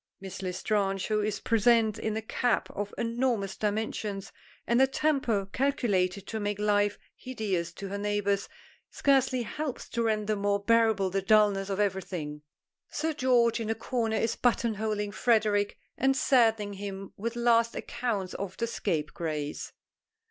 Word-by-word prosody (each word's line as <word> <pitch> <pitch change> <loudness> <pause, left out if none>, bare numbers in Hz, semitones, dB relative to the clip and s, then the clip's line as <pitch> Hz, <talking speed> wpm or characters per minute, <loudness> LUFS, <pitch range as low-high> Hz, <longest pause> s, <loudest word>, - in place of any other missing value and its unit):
Miss 190 -1 -7
L'Estrange, 195 +1 -1
who 215 -1 +2
is 210 -1 -1
present 225 -1 +3
in 220 0 -2
a 220 - -4
cap 245 +2 0
of 205 0 -4
enormous 230 -4 0
dimensions 210 -1 -2 0.3
and 235 +2 +3
a 265 - +6
temper 265 -8 +1
calculated 200 -9 +1
to 220 - -4
make 205 -1 -2
life 205 0 +2 0.2
hideous 200 -9 -3
to 195 +2 -7
her 200 +1 -4
neighbors, 205 -1 0 0.4
scarcely 265 -3 +2
helps 290 +3 -5
to 235 - -1
render 215 -1 +1
more 200 0 +1
bearable 220 -3 +3
the 195 +1 0
dullness 205 -1 +3
of 195 0 -2
everything. 180 -7 -2 0.5
Sir 315 +1 -1
George 245 -4 +3
in 225 -1 -3
a 225 - +1
corner 225 -1 -1
is 225 - 0
buttonholing 215 -4 0
Frederic 205 -1 +2 0.2
and 270 +1 +3
saddening 225 -7 +3
him 195 -1 -7
with 230 +3 -4
last 230 -1 +3
accounts 205 -7 -3
of 195 -2 -5
the 230 - 0
Scapegrace. 155 -7 -3
210 Hz, 145 wpm, -29 LUFS, 195-235 Hz, 0.5 s, a